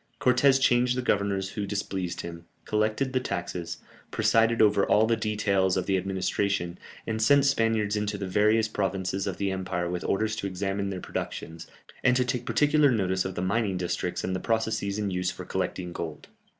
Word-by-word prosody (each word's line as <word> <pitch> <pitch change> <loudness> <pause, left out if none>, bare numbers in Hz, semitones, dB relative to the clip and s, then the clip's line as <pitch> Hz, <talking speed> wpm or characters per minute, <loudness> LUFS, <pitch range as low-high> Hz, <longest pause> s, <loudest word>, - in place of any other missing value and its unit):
Cortès 130 +2 +4
changed 125 -1 +3
the 125 - -1
governors 100 -3 0
who 100 -1 -4
displeased 95 -3 -3
him, 85 0 -8 0.2
collected 110 +5 0
the 130 - +2
taxes, 85 -6 -4 0.3
presided 115 +1 +2
over 105 -2 +4
all 105 +2 +4
the 115 +1 +2
details 100 -4 +1
of 95 - -1
the 95 - +1
administration, 95 -1 -1 0.3
and 110 0 -2
sent 140 +5 +5
Spaniards 115 -6 +2
into 105 0 -1
the 100 - -4
various 105 +3 +3
provinces 95 -2 -2
of 95 - -3
the 100 -1 -1
empire 95 -2 -2
with 90 -1 -3
orders 110 +2 0
to 100 - -2
examine 100 +1 -2
their 95 -2 -4
productions, 80 0 -6 0.4
and 125 - +4
to 125 - +2
take 125 -1 -2
particular 150 0 +4
notice 95 -6 +1
of 95 -1 -4
the 90 - -2
mining 100 0 0
districts 90 -1 -2
and 95 - -1
the - - -2
processes 110 -2 -1
in 105 -2 -1
use 90 0 -1
for - - -7
collecting 90 -1 -3
gold. 80 -4 -6
100 Hz, 185 wpm, -27 LUFS, 95-110 Hz, 0.4 s, sent